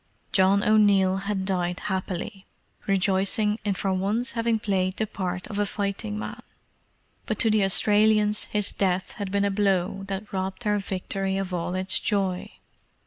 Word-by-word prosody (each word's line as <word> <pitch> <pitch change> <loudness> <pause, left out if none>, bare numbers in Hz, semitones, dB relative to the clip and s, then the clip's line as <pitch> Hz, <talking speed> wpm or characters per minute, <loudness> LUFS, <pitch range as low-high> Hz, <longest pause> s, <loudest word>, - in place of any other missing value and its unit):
John 195 +1 +3
O'Neill 200 -3 +4
had 195 0 -2
died 180 -2 -1
happily, 190 0 -4 0.4
rejoicing 195 +2 +2
in 200 -2 0
for 195 0 -1
once 205 +7 0
having 230 -1 0
played 190 -3 -1
the 220 - 0
part 185 -3 -4
of 205 - -5
a 205 - +2
fighting 205 +1 -3
man; - - -6 0.9
but 215 - -1
to 225 - +3
the 215 -1 +3
Australians 210 +2 +4
his 210 -1 -1
death 185 -2 -1
had 195 -2 -3
been 200 0 +1
a 200 - +1
blow 195 -1 0
that 200 +1 -5
robbed 190 +4 -3
their 210 -1 +1
victory 195 0 -3
of 190 -1 -3
all 180 +1 -2
its 185 0 +2
joy. 195 -4 -1
195 Hz, 160 wpm, -25 LUFS, 190-210 Hz, 0.9 s, O'Neill